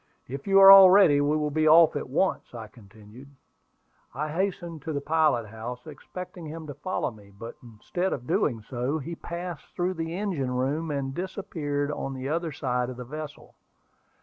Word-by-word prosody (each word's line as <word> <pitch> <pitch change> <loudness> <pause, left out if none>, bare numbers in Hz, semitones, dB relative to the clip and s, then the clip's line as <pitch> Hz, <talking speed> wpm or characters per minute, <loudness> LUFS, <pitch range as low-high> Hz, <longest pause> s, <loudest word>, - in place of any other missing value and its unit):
"If 135 +6 -7
you 195 0 +5
are 195 0 +10
all 195 -1 +10
ready, 180 -7 +5
we 145 +2 +1
will 150 -1 -2
be 155 +1 +1
off 160 0 +6
at 145 - -4
once," 150 -2 -1
I 115 -2 -7
continued. 110 +4 -16 0.9
I 150 +3 -3
hastened 170 -2 -3
to 160 +2 -5
the 140 - -1
pilot 155 -5 +1
house, 120 +3 -8
expecting 170 +3 -9
him 160 +1 -8
to 145 - -7
follow 185 -3 -3
me; 105 -3 -17
but 100 +4 -10
instead 125 - -4
of 125 - -4
doing 115 -4 0
so, 125 +5 -3
he 160 +3 -6
passed 170 -1 -7
through 180 +1 -1
the 165 -1 -4
engine 180 -11 -2
room, 145 +6 -1
and 140 -2 -3
disappeared 150 -5 -3
on 135 -2 -5
the 130 +1 -5
other 165 +1 -2
side 125 -3 -2
of 125 - -8
the 125 - -7
vessel. 150 +3 -9
150 Hz, 185 wpm, -26 LUFS, 125-170 Hz, 0.9 s, are